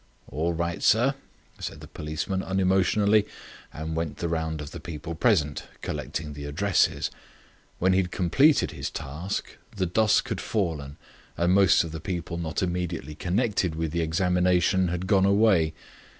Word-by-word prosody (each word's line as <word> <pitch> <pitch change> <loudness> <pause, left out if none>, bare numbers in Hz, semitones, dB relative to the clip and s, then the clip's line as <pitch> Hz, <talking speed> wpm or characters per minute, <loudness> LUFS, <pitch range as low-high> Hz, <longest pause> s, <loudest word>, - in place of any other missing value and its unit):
"All 80 +5 -1
right, 85 +1 -2
sir," 125 +6 +4 0.5
said - - -5
the - - -11
policeman 80 +5 -3
unemotionally, 95 +3 +2 0.4
and 80 +1 -5
went 80 -2 -3
the 85 - -2
round 80 -1 -2
of 75 -1 -7
the - - -7
people 85 0 -6
present, 80 -6 +1 0.2
collecting 75 -2 -4
the 70 0 -7
addresses. 85 +7 +1 0.7
When 95 +1 +3
he 95 - +4
had 90 - -4
completed 135 - +3
his - - -4
task 80 +9 -5 0.2
the 95 -2 0
dusk 105 +4 +2
had - - -2
fallen 80 -9 -2 0.4
and 85 +1 +2
most 95 -3 +5
of 80 - -6
the 80 -1 -6
people 85 -1 -4
not 80 0 -2
immediately 85 -4 -3
connected 95 -1 0
with 80 -1 -2
the 85 +1 0
examination 90 +2 +2
had 90 +1 -2
gone 95 -1 +4
away. 100 -6 +4
85 Hz, 155 wpm, -26 LUFS, 80-95 Hz, 0.7 s, most